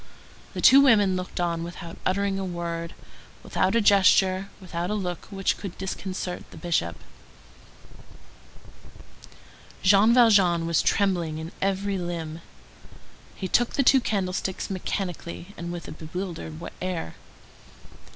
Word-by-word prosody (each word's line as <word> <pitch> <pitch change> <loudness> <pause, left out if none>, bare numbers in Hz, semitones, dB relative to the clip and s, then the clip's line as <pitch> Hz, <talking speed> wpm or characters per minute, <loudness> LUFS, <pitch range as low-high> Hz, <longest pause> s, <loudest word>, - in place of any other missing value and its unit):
The - - -3
two 275 +1 +8
women 205 -8 +5
looked 185 0 -5
on 170 -1 -1
without 170 0 -8
uttering 195 +1 0
a - - -3
word, 170 -2 -4 0.5
without - - 0
a 230 - +4
gesture, 195 -1 +4
without 175 -2 -4
a 210 - -1
look 180 -4 -4
which 195 -2 -1
could 195 -4 -7
disconcert 190 -1 -5
the - - -13
Bishop. 125 - -1 2.9
Jean 200 +4 +6
Valjean 200 -9 +5
was 165 -1 +2
trembling 175 -6 +1
in 160 +1 -6
every 195 0 0
limb. 170 -2 -5 0.9
He 190 - -4
took 240 +5 +2
the 275 - +2
two 265 +1 +6
candlesticks 190 -3 -2
mechanically, 180 -1 -4
and 170 0 -6
with 175 -1 -6
a - - -7
bewildered 160 - -6 0.3
air. 180 - -3
185 Hz, 125 wpm, -25 LUFS, 170-195 Hz, 2.9 s, two